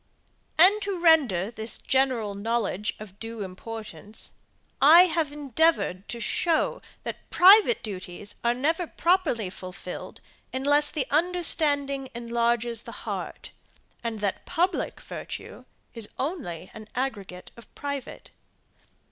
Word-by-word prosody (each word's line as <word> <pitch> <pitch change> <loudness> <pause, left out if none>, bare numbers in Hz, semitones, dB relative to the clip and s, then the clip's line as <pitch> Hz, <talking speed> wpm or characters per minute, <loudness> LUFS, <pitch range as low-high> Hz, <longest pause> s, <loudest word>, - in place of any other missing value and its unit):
And 385 +6 +7
to 400 -2 -2
render 275 - +4
this 220 -1 -1
general 255 -6 +1
knowledge 210 -1 -2
of 205 -2 -11
due 225 -2 -6
importance, 215 +2 -8 0.5
I 325 +5 +9
have 325 -4 0
endeavoured 290 - +1
to 235 - -5
show 325 +8 0 0.2
that - - -7
private 420 - +7
duties 195 -1 -7
are 235 0 +2
never 320 +7 0
properly 315 - +1
fulfilled, 185 -1 -8 0.3
unless 290 +3 +3
the 295 -4 -2
understanding 295 -5 +2
enlarges 235 -1 0
the - - -10
heart; - - -5 0.5
and 225 -2 -4
that 200 -2 -2
public 360 +3 0
virtue - - -8 0.3
is 225 -3 -3
only 260 - -4
an 215 -1 -10
aggregate 200 -9 -4
of 235 -2 -15
private. 280 -2 -6
245 Hz, 115 wpm, -26 LUFS, 215-315 Hz, 0.5 s, I